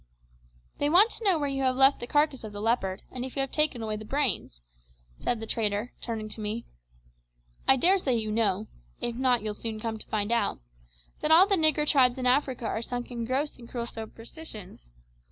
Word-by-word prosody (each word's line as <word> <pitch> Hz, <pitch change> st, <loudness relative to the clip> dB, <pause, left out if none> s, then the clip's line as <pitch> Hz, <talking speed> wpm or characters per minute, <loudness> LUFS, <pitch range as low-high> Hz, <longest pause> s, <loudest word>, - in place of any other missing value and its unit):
"They 290 Hz, -, +1 dB
want 390 Hz, +8 st, +6 dB
to -, -, -7 dB
know 385 Hz, -5 st, +4 dB
where 290 Hz, -2 st, -1 dB
you 275 Hz, -1 st, -2 dB
have 260 Hz, -1 st, +1 dB
left 270 Hz, +1 st, +6 dB
the 240 Hz, -, -6 dB
carcass 290 Hz, -2 st, +1 dB
of 215 Hz, -1 st, -8 dB
the 205 Hz, -, -6 dB
leopard, 205 Hz, -4 st, -1 dB
and 250 Hz, -, -5 dB
if 260 Hz, -, -7 dB
you 275 Hz, -, +1 dB
have 270 Hz, -, -2 dB
taken 300 Hz, -6 st, +1 dB
away 215 Hz, -1 st, -2 dB
the 215 Hz, -, -8 dB
brains," 215 Hz, -, -1 dB, 0.6 s
said 240 Hz, -, -1 dB
the 225 Hz, -, -5 dB
trader, 215 Hz, +1 st, -1 dB
turning 225 Hz, -2 st, -4 dB
to 215 Hz, -, -7 dB
me. 215 Hz, +3 st, -3 dB, 1.0 s
"I 265 Hz, -, +8 dB
daresay 340 Hz, -2 st, +3 dB
you 215 Hz, -2 st, -2 dB
know 210 Hz, -2 st, 0 dB, 0.3 s
if 235 Hz, -, -2 dB
not 250 Hz, -2 st, +2 dB
you'll 215 Hz, -1 st, -2 dB
soon 220 Hz, 0 st, -5 dB
come 220 Hz, 0 st, -4 dB
to -, -, -9 dB
find 210 Hz, 0 st, -2 dB
out 235 Hz, -, +1 dB, 0.6 s
that 300 Hz, -, -1 dB
all 330 Hz, +4 st, +8 dB
the 400 Hz, -, 0 dB
nigger 310 Hz, -3 st, +2 dB
tribes 255 Hz, -4 st, +4 dB
in 255 Hz, -, -3 dB
Africa 255 Hz, -1 st, +1 dB
are 220 Hz, -, -2 dB
sunk 245 Hz, +1 st, -5 dB
in 235 Hz, -1 st, -4 dB
gross 270 Hz, +5 st, -1 dB
and 235 Hz, -2 st, -13 dB
cruel 235 Hz, -2 st, -3 dB
superstitions. 225 Hz, -, -9 dB
245 Hz, 210 wpm, -28 LUFS, 220-275 Hz, 1.0 s, I